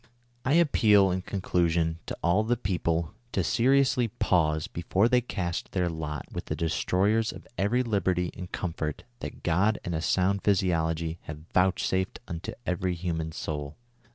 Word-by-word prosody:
"I 130 Hz, -, +1 dB
appeal, 110 Hz, -, +5 dB
in 90 Hz, +1 st, -1 dB
conclusion, 85 Hz, -4 st, 0 dB
to -, -, -4 dB
all 90 Hz, +5 st, +3 dB
the 120 Hz, +2 st, +1 dB
people, 85 Hz, -6 st, -1 dB, 0.2 s
to 95 Hz, -, +1 dB
seriously 125 Hz, +3 st, +3 dB
pause 80 Hz, -6 st, +1 dB
before 95 Hz, +5 st, +1 dB
they 125 Hz, 0 st, +3 dB
cast 90 Hz, -7 st, -4 dB
their 90 Hz, -2 st, +1 dB
lot 75 Hz, -3 st, -4 dB
with -, -, -5 dB
the -, -, -3 dB
destroyers 100 Hz, +7 st, +1 dB
of -, -, -11 dB
every 115 Hz, +6 st, +1 dB
liberty 95 Hz, -6 st, 0 dB
and 90 Hz, -, -8 dB
comfort 80 Hz, -4 st, -3 dB, 0.2 s
that -, -, -7 dB
God 95 Hz, +6 st, +2 dB
and 85 Hz, -, -2 dB
a 80 Hz, -, -1 dB
sound 95 Hz, +4 st, +2 dB
physiology 85 Hz, -4 st, +1 dB
have 75 Hz, 0 st, -8 dB
vouchsafed 95 Hz, +1 st, +1 dB
xuito 85 Hz, -2 st, -5 dB
every 90 Hz, 0 st, -1 dB
human 80 Hz, -2 st, -3 dB
soul. 75 Hz, -2 st, -5 dB
90 Hz, 155 wpm, -28 LUFS, 80-100 Hz, 0.2 s, appeal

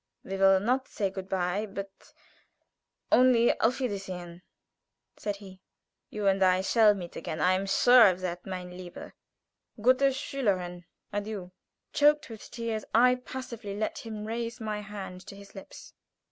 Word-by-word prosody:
"We 195 Hz, -, -5 dB
will 195 Hz, 0 st, +5 dB
not 250 Hz, +6 st, 0 dB
say 200 Hz, -2 st, -2 dB
good 190 Hz, 0 st, -7 dB
bye, 190 Hz, +3 st, -1 dB
but 195 Hz, -1 st, -9 dB, 1.0 s
only 245 Hz, -2 st, +5 dB
auf 245 Hz, +4 st, +2 dB
wiedersehen!" 185 Hz, -7 st, -5 dB, 0.7 s
said 205 Hz, -1 st, -3 dB
he. 190 Hz, -2 st, -13 dB, 0.5 s
"You 210 Hz, -1 st, -4 dB
and 195 Hz, 0 st, +3 dB
I 185 Hz, 0 st, +4 dB
shall 210 Hz, +2 st, +4 dB
meet 175 Hz, -3 st, -8 dB
again. 160 Hz, -1 st, -5 dB
I 180 Hz, +4 st, +4 dB
am 190 Hz, +1 st, -1 dB
sure 245 Hz, +4 st, +7 dB
of 185 Hz, -1 st, +1 dB
that. 180 Hz, -1 st, -4 dB
Meine 180 Hz, -1 st, -6 dB
liebe, 180 Hz, -1 st, -9 dB, 0.7 s
gute 255 Hz, +5 st, +4 dB
Schülerin, 195 Hz, -10 st, -2 dB, 0.3 s
adieu!" 205 Hz, -3 st, -4 dB, 0.4 s
Choked 295 Hz, -3 st, +3 dB
with 220 Hz, -, -10 dB
tears, 230 Hz, -3 st, -3 dB
I 250 Hz, +2 st, +6 dB
passively 250 Hz, -5 st, -7 dB
let 215 Hz, -, -2 dB
him 215 Hz, -2 st, -7 dB
raise 230 Hz, +2 st, -4 dB
my 215 Hz, -2 st, -3 dB
hand 195 Hz, -3 st, -8 dB
to -, -, -9 dB
his 200 Hz, 0 st, -14 dB
lips. 195 Hz, -, -12 dB
200 Hz, 150 wpm, -28 LUFS, 185-230 Hz, 1.0 s, sure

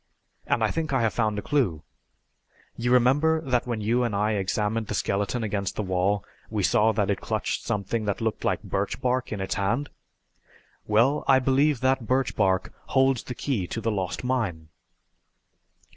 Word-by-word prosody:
And -, -, +1 dB
I -, -, +2 dB
think 160 Hz, -2 st, -2 dB
I 130 Hz, -3 st, +2 dB
have 110 Hz, -, +1 dB
found 110 Hz, -3 st, 0 dB
a 105 Hz, -, -3 dB
clue. 100 Hz, -, 0 dB, 0.9 s
You 120 Hz, +1 st, -1 dB
remember 140 Hz, +6 st, +4 dB
that 125 Hz, -5 st, 0 dB
when 115 Hz, -3 st, -2 dB
you 115 Hz, +4 st, +1 dB
and 115 Hz, -4 st, -1 dB
I 105 Hz, +2 st, +1 dB
examined 105 Hz, +2 st, -1 dB
the 105 Hz, -, -3 dB
skeleton 100 Hz, +5 st, -1 dB
against 100 Hz, -3 st, -2 dB
the 105 Hz, -, -2 dB
wall 95 Hz, +1 st, 0 dB, 0.2 s
we 105 Hz, -3 st, -1 dB
saw 110 Hz, +2 st, +4 dB
that 105 Hz, -2 st, +1 dB
it 100 Hz, -, -2 dB
clutched -, -, -2 dB
something 105 Hz, +2 st, -1 dB
that 100 Hz, -2 st, -1 dB
looked 110 Hz, -1 st, -2 dB
like -, -, 0 dB
birch -, -, -2 dB
bark 125 Hz, 0 st, -1 dB
in 105 Hz, -, -3 dB
its 95 Hz, -, -2 dB
hand? 120 Hz, +9 st, -1 dB, 1.0 s
Well, 120 Hz, +8 st, +3 dB
I 135 Hz, -, +6 dB
believe 135 Hz, +1 st, +2 dB
that 130 Hz, -3 st, +1 dB
birch 130 Hz, -1 st, +1 dB
bark 95 Hz, -3 st, +1 dB
holds 135 Hz, -2 st, +3 dB
the 125 Hz, -, -7 dB
key 115 Hz, -11 st, -2 dB
to 115 Hz, -, -4 dB
the 115 Hz, 0 st, -1 dB
lost 95 Hz, -1 st, -3 dB
mine!" 105 Hz, -12 st, -2 dB
110 Hz, 180 wpm, -26 LUFS, 100-130 Hz, 1.0 s, I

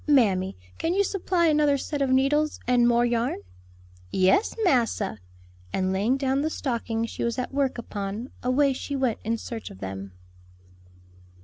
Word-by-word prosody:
"Mammy, 200 Hz, -, +3 dB, 0.2 s
can 335 Hz, +2 st, 0 dB
you 400 Hz, -, +4 dB
supply 370 Hz, -3 st, 0 dB
another 300 Hz, -2 st, +3 dB
set 285 Hz, +1 st, -3 dB
of 275 Hz, -, +2 dB
needles, 285 Hz, +4 st, +2 dB
and 245 Hz, -1 st, +4 dB
more 240 Hz, 0 st, +4 dB
yarn?" 240 Hz, 0 st, 0 dB, 0.7 s
"Yes, 190 Hz, -, +3 dB
massa;" 230 Hz, -, +1 dB, 0.5 s
and 190 Hz, 0 st, 0 dB
laying 215 Hz, +8 st, +1 dB
down 270 Hz, 0 st, +1 dB
the 310 Hz, -, 0 dB
stocking 230 Hz, -6 st, -2 dB
she -, -, -5 dB
was 235 Hz, +1 st, -1 dB
at 255 Hz, +1 st, -3 dB
work 275 Hz, -2 st, 0 dB
upon, 210 Hz, +1 st, -5 dB
away 270 Hz, +2 st, +3 dB
she 280 Hz, +2 st, -4 dB
went 260 Hz, -5 st, 0 dB
in 230 Hz, +1 st, 0 dB
search 225 Hz, 0 st, -6 dB
of -, -, -12 dB
them. 95 Hz, 0 st, -6 dB
250 Hz, 155 wpm, -26 LUFS, 220-280 Hz, 0.7 s, you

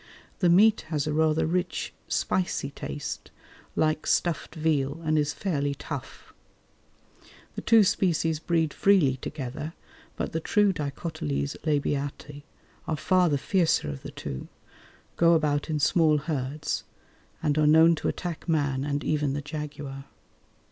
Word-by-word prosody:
The 180 Hz, -, +3 dB
meat 210 Hz, +5 st, +5 dB
has 150 Hz, -3 st, -1 dB
a 150 Hz, -, -1 dB
rather 155 Hz, 0 st, +2 dB
rich, 175 Hz, +2 st, -2 dB
spicy 180 Hz, -6 st, -1 dB
taste, 145 Hz, 0 st, -6 dB, 0.5 s
like 155 Hz, 0 st, +1 dB
stuffed 165 Hz, -4 st, 0 dB
veal, 155 Hz, -2 st, 0 dB
and 155 Hz, 0 st, +1 dB
is 150 Hz, -1 st, +2 dB
fairly 145 Hz, -5 st, -1 dB
tough. -, -, -8 dB, 1.2 s
The -, -, -5 dB
two 225 Hz, -2 st, +6 dB
species 165 Hz, -5 st, +1 dB
breed 160 Hz, -2 st, 0 dB
freely 170 Hz, -10 st, +3 dB
together, 145 Hz, +3 st, -6 dB, 0.4 s
but -, -, -3 dB
the 160 Hz, -, -1 dB
true 205 Hz, +3 st, +2 dB
D. 150 Hz, -, -5 dB
labiati 145 Hz, -, -3 dB, 0.5 s
are 155 Hz, -, -1 dB
far 180 Hz, +3 st, +3 dB
the 145 Hz, -, +2 dB
fiercer 165 Hz, -, +1 dB
of 70 Hz, -, -8 dB
the -, -, -7 dB
two, 65 Hz, -2 st, -6 dB, 0.7 s
go 170 Hz, 0 st, +5 dB
about 150 Hz, -1 st, 0 dB
in 155 Hz, -, 0 dB
small 155 Hz, +1 st, +3 dB
herds 150 Hz, -1 st, -3 dB, 0.6 s
and 145 Hz, -, +2 dB
are 150 Hz, -, +4 dB
known 160 Hz, +2 st, +7 dB
to -, -, -2 dB
attack 175 Hz, -1 st, -4 dB
man 140 Hz, -4 st, +1 dB
and 145 Hz, 0 st, -2 dB
even 150 Hz, -3 st, 0 dB
the 145 Hz, -, -2 dB
jaguar. 145 Hz, -2 st, -6 dB
155 Hz, 140 wpm, -27 LUFS, 145-165 Hz, 1.2 s, known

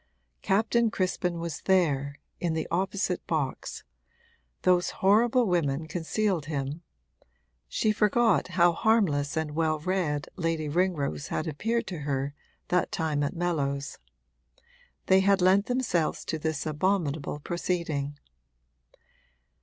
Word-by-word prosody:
Captain 230 Hz, +3 st, +2 dB
Crispin 180 Hz, -4 st, -1 dB
was 165 Hz, -3 st, -4 dB
there, 145 Hz, -7 st, +2 dB, 0.2 s
in 170 Hz, -2 st, -1 dB
the 160 Hz, -, -2 dB
opposite 190 Hz, +1 st, -1 dB
box; 145 Hz, -5 st, -3 dB, 0.8 s
those 180 Hz, -1 st, +3 dB, 0.2 s
horrible 235 Hz, +5 st, +5 dB
women 160 Hz, -5 st, 0 dB
concealed 175 Hz, 0 st, -1 dB
him 145 Hz, +1 st, -3 dB, 0.9 s
(she 215 Hz, -, +1 dB
forgot 220 Hz, +2 st, +3 dB
how 175 Hz, 0 st, +6 dB
harmless 165 Hz, -7 st, +1 dB
and 160 Hz, -1 st, -1 dB
well 155 Hz, 0 st, +1 dB
read 155 Hz, -3 st, -1 dB
Lady 165 Hz, -3 st, -1 dB
Ringrose 150 Hz, -, 0 dB
had 155 Hz, -, -2 dB
appeared 225 Hz, +10 st, -1 dB
to 180 Hz, -4 st, -5 dB
her 140 Hz, -1 st, -2 dB, 0.4 s
that 180 Hz, 0 st, +1 dB
time 155 Hz, -3 st, -1 dB
at 145 Hz, -, -1 dB
Mellows); 145 Hz, -5 st, -2 dB, 1.1 s
they 190 Hz, 0 st, +5 dB
had 200 Hz, +1 st, +4 dB
lent 190 Hz, +3 st, +4 dB
themselves 245 Hz, -11 st, 0 dB
to 160 Hz, -, -3 dB
this 155 Hz, -1 st, -2 dB
abominable 155 Hz, -2 st, -1 dB
proceeding. 155 Hz, -4 st, -2 dB
170 Hz, 115 wpm, -28 LUFS, 150-190 Hz, 1.1 s, how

